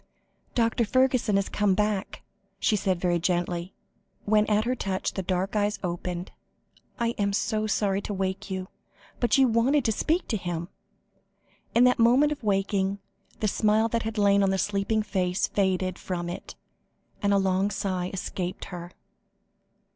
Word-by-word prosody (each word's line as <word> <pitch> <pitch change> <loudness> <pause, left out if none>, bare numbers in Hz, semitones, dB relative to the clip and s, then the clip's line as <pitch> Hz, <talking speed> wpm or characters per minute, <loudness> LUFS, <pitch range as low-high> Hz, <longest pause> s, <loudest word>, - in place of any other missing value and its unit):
"Dr. 230 0 +2
Fergusson 255 -2 +2
has 195 -1 +1
come 205 -2 +1
back," 210 -1 -1 0.4
she 220 - +2
said 190 -3 0
very 175 -1 +1
gently, 175 +1 -1 0.5
when 210 0 +3
at 215 +1 +2
her 250 - +1
touch 195 -6 -2
the 190 - -2
dark 185 +2 -1
eyes 210 0 +1
opened. 175 0 -4 0.7
"I 235 -1 +1
am 200 -1 +1
so 215 +1 0
sorry 200 -2 +1
to 205 - -4
wake 190 +1 -3
you, 190 -1 -4 0.5
but 240 0 +3
you 265 -1 +5
wanted 245 +5 +2
to 225 - +3
speak 325 - 0
to 220 - +1
him." 175 -2 -4 1.1
In 240 - +6
that 250 -1 +4
moment 255 +6 +5
of 295 -1 -4
waking, 195 -1 0 0.4
the 215 - +2
smile 215 +2 +2
that 230 0 0
had 225 0 -4
lain 200 -1 +4
on 195 - +3
the 190 - +1
sleeping 205 +2 0
face 185 -3 0
faded 185 -2 0
from 175 -2 -4
it, 175 - -7 0.7
and 200 - +2
a 200 - +4
long 190 +1 +2
sigh 185 -3 -2
escaped 185 -1 -4
her. 175 0 -7
200 Hz, 160 wpm, -27 LUFS, 185-220 Hz, 1.1 s, In